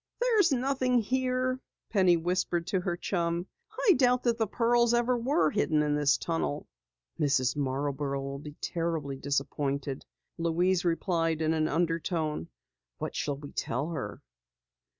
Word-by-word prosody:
"There's 445 -8 +3
nothing 255 -1 +1
here," 255 +2 0 0.3
Penny 185 -5 +4
whispered 175 0 0
to 190 +1 0
her 175 -1 -2
chum. 170 -1 -1 0.4
"I 390 - +9
doubt 250 -3 +3
that 235 -1 +1
the 225 - +2
pearls 235 +2 +3
ever 240 +1 +2
were 230 - +2
hidden 155 -1 +2
in 150 0 +1
this 150 0 +3
tunnel." 165 -3 -2 0.5
"Mrs. 130 -4 +2
Marborough 140 0 -2
will 140 0 -5
be 150 0 -9
terribly 165 -5 -2
disappointed," 140 0 -2 0.4
Louise 175 +2 +2
replied 165 -2 0
in 160 0 +1
an 155 -1 +1
undertone. 165 - -1 0.5
"What - - -5
shall 145 -1 -1
we 145 0 -9
tell 140 +7 -2
her?" 155 -6 -5
170 Hz, 140 wpm, -29 LUFS, 145-235 Hz, 0.5 s, I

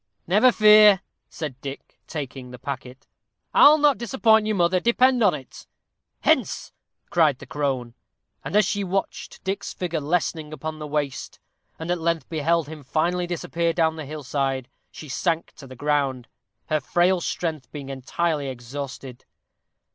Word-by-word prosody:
"Never 210 +8 +5
fear," 210 -3 +7 0.3
said 140 -5 -6
Dick, 140 0 -9
taking 135 -4 -6
the 125 - -9
packet; 130 -1 -7 0.5
"I'll 300 +1 +8
not 295 -2 +3
disappoint 220 -3 +3
you, 215 - 0
mother, 180 0 +2
depend 250 +4 +3
upon 200 -7 +4
it." 130 -3 -11 0.5
"Hence!" - - +1 0.4
cried 155 -6 +3
the - - -11
crone; 135 -5 -2 0.5
and - - -5
as 210 -1 +5
she 200 +2 -1
watched 195 +1 -4
Dick's 195 +1 -3
figure 170 -3 -2
lessening 155 0 -1
upon 155 0 -6
the 150 - -6
Waste, 145 -2 -3 0.4
and 165 +2 -4
at 175 -2 -1
length 165 -4 0
beheld 165 0 +1
him 155 -1 -9
finally 175 +5 0
disappear 170 -1 -1
down 160 -1 +1
the 155 -2 -6
hill 150 0 -7
side, 135 -1 -1 0.2
she 155 - -11
sank 165 +4 -1
to 140 - -11
the 130 - -11
ground, 140 -3 -1 0.4
her 155 -1 +2
frail 175 +5 +2
strength 160 -6 -3
being 140 -2 -7
entirely 145 +3 -2
exhausted. 130 0 -7
160 Hz, 155 wpm, -24 LUFS, 140-180 Hz, 0.5 s, I'll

